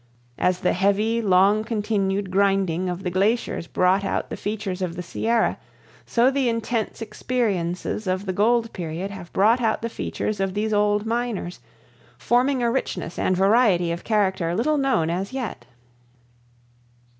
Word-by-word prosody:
As 180 0 +1
the - - +2
heavy, 205 +5 +1
long 200 +1 +4
continued 205 -3 -1
grinding 190 -2 +1
of 180 +1 -5
the 180 - -2
glaciers 200 -1 0
brought 185 +3 +2
out - - -2
the - - -2
features 205 -3 -4
of 175 -2 -2
the 180 - -5
Sierra, 225 +6 0 0.5
so 245 +3 +3
the 270 -3 +1
intense 230 -1 -2
experiences 210 -5 -2
of 185 +2 -1
the 190 - -2
gold 230 +3 +2
period 175 +3 -4
have 190 -3 -9
brought 225 +6 +3
out 220 -1 0
the 230 - -1
features 215 -2 -3
of 195 0 -1
these 215 +1 -1
old 205 0 +2
miners, 230 -6 -3 0.6
forming 250 +1 +1
a 235 - +2
richness 185 -9 -3
and 185 - +1
variety 195 -4 +3
of 170 - -4
character 190 -6 0
little 295 +8 +1
known 235 -13 +1
as 190 +7 -3
yet. 220 - -5
205 Hz, 155 wpm, -23 LUFS, 185-230 Hz, 0.6 s, long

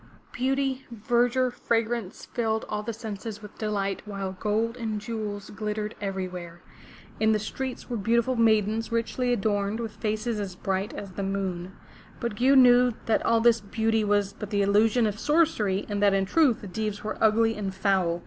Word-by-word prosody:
Beauty, 270 0 0
verdure, 240 +3 +1
fragrance 230 -4 -2
filled 220 -2 -1
all 210 0 -2
the 220 +2 -4
senses 220 -1 -7
with 210 - -12
delight 200 -2 -1
while 195 -2 -4
gold 215 +4 -1
and 220 -3 -3
jewels 210 -2 -5
glittered 210 0 -3
everywhere. 185 -3 -5 0.6
In 220 0 +4
the - - +3
streets 255 +5 -5
were 240 - -3
beautiful 235 +4 +1
maidens 220 -1 +2
richly 235 +2 0
adorned, 205 -1 0
with 225 -2 -3
faces 215 +1 -2
as 195 -3 -4
bright 190 +1 -2
as 200 -2 -7
the 190 - -5
moon. 190 -2 -3 0.4
But 235 -2 -2
Gew 260 +5 +4
knew 250 -1 +6
that 225 - +2
all 230 0 +3
this 230 -1 +4
beauty 220 +2 0
was 205 -1 +1
but 210 -1 -7
the 200 -1 +1
illusion 215 +4 +3
of 210 0 -2
sorcery 230 - +2
and 205 -1 -2
that 200 -1 +4
in 195 0 +2
truth 270 +2 +3
the 205 - -7
Deevs 210 +2 -3
were 215 +1 -3
ugly 225 +1 +4
and 200 -2 -3
foul. 190 -3 +1
215 Hz, 175 wpm, -27 LUFS, 200-230 Hz, 0.6 s, knew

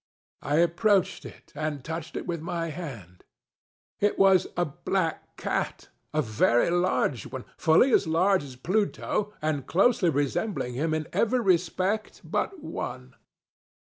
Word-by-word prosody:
I 145 - -1
approached 180 +2 +2
it, - - -12
and 150 -2 -3
touched 160 0 -5
it - - -5
with 170 -3 -3
my 165 0 -3
hand. 115 - -8 0.8
It 205 0 +1
was 195 -1 +5
a 175 - +2
black 165 +3 -3
catŌĆöa 155 0 -3
very 115 +6 +2
large 175 -8 +1
oneŌĆöfully 160 - +2
as - - +4
large 185 +3 +3
as 135 -3 -10
Pluto, 205 +6 -1
and 145 -4 -1
closely 195 0 +3
resembling 145 - -1
him 155 +5 0
in 155 -1 -3
every 240 +3 +2
respect 185 +2 0
but 370 -6 -2
one. - - -6
170 Hz, 130 wpm, -27 LUFS, 150-195 Hz, 0.8 s, was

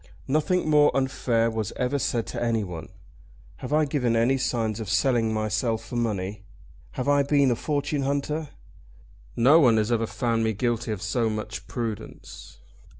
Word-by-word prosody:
"Nothing 155 +5 +1
more 150 -1 +5
unfair 120 -3 +1
was 110 -3 -3
ever 130 +2 -1
said 120 -3 -1
to - - -5
anyone. 105 -9 -2 0.7
Have 125 - -7
I 155 +1 +3
given 125 -5 0
any 115 +4 +3
signs 115 -4 -1
of 110 -3 -5
selling 115 0 +2
myself 110 +1 -1
for 125 - -8
money? 105 -4 -2 0.5
Have 130 - -3
I 145 0 +4
been 140 -2 +3
a - - +2
fortune 145 +2 -2
hunter? 145 +2 -2 0.9
No 135 +7 +6
one 120 -7 +5
has 110 +2 0
ever 115 -1 +1
found 115 -1 -1
me 110 0 +1
guilty 120 +1 -1
of 105 -4 -4
so 115 -3 0
much 110 0 -5
prudence. 115 - -7
120 Hz, 160 wpm, -25 LUFS, 110-140 Hz, 0.9 s, No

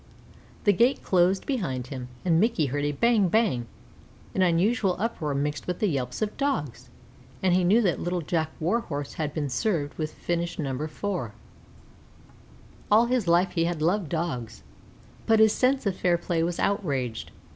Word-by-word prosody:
The 205 - +5
gate 240 +8 +2
closed 185 +1 +2
behind 150 - -2
him, 125 -2 -6 0.2
and 165 -2 +3
Mickey 220 -6 +2
heard 145 +2 -2
a 145 - +1
bang 215 +5 +3
bang, 180 - +1 0.7
an 190 - 0
unusual 185 +3 +2
uproar 170 -9 -2
mixed 145 +2 -2
with 180 +3 -3
yelps 135 - -1
of 215 - -3
Dogs, 145 - -2 0.5
and 185 -2 +3
he 180 0 +3
knew 210 +7 +4
that 180 -4 +1
Little 175 0 -2
Jack 160 0 -1
Warhorse 160 - -2
had 150 -1 -1
been 150 -1 -2
served 145 - -1
with 155 -1 -2
finish 170 0 -2
No. 140 0 -2
4. 160 - -4 1.6
All 220 +3 +6
his 240 -5 0
life 175 +2 +3
he 165 -2 +1
had 170 -3 -2
loved 175 0 +1
Dogs, 145 -9 -3 0.6
but 225 - +5
his 220 -1 +5
sense 260 0 +1
of 195 -2 0
fair 175 -1 +2
play 170 -1 -1
was 170 +1 -1
outraged. 140 - -1
175 Hz, 165 wpm, -26 LUFS, 145-205 Hz, 1.6 s, All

